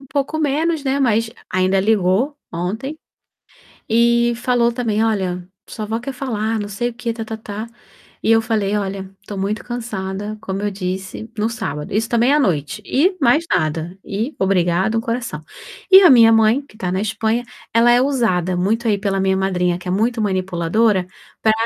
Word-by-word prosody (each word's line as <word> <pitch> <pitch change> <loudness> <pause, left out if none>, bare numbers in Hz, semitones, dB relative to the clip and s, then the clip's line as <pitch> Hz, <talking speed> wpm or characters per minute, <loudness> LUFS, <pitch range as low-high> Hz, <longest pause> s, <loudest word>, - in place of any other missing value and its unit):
um 275 - -15
pouco 280 +3 -2
menos, 310 +1 0
né, 275 +1 0
mas 225 -3 +2 0.2
ainda 185 +1 +2
ligou 215 +7 +1 0.2
ontem 220 - -4 0.9
e 235 +1 +3
falou 240 -1 +2
também: 225 -2 0
"Olha, 185 -5 -1 0.2
sua 215 - -6
avó 225 +2 -2
quer 265 +3 -6
falar, 225 -4 -2
não 205 0 -4
sei 240 +4 -2
o - - -10
quê 235 0 -3
tá-tá-tá", 220 -1 -6 0.6
e - - +1
eu 225 0 +4
falei: 210 -2 0
"Olha, 195 -1 -3
estou 200 0 -7
muito 205 +2 -2
cansada, 210 -4 -4
como 195 -1 -4
eu 205 - -1
disse", 190 +3 -5
no 215 - +1
sábado, 150 -11 -5
isso 225 +2 +1
também 240 +4 +3
à 300 - +4
noite, 150 - -1
e 365 +8 +2
mais 290 +7 +4
nada, 160 +2 -1
e 220 +9 -3
obrigada 190 +2 +2
um - - +1
coração. 230 -9 -4 0.5
E 380 +1 +10
a 360 - +8
minha 230 -3 +7
mãe, 225 +3 +4
que - - -21
está 185 -4 -3
na 185 - 0
Espanha, 220 +3 -1 0.3
ela 230 +1 +5
é 245 +1 +5
usada 200 -10 +1
muito 220 +6 0
aí 205 - +2
pela 195 -1 -1
minha 190 0 +2
madrinha, 180 -2 0
que 180 - -14
é - - 0
muito 225 +5 0
manipuladora, 190 +1 +1 0.3
para 220 - +4
220 Hz, 180 wpm, -19 LUFS, 190-235 Hz, 0.9 s, E